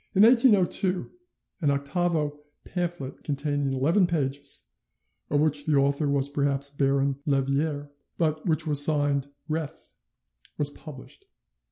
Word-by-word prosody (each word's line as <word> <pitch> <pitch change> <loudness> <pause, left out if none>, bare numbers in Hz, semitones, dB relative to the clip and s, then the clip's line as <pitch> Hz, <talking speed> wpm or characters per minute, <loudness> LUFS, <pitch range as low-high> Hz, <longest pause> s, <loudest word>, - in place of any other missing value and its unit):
In 195 - +6
1802 205 -6 +3 0.5
an 150 - +2
octavo 150 +1 -1 0.3
pamphlet 175 -7 -5
containing 145 -1 -2
11 160 +9 +2
pages, 140 -4 -2 0.6
of 145 0 +1
which 150 -1 0
the 155 - +2
author 140 +1 +1
was 140 -1 +1
perhaps 140 -1 -1
Baron 140 -1 0
Lerviere, 145 +1 -1 0.3
but 155 -2 0
which 160 -1 +1
was 145 -2 +7
signed 145 -2 +2 0.2
Reth, 155 -2 -5 0.6
was 145 -1 -1
published. 150 - -12
145 Hz, 120 wpm, -26 LUFS, 140-160 Hz, 0.6 s, was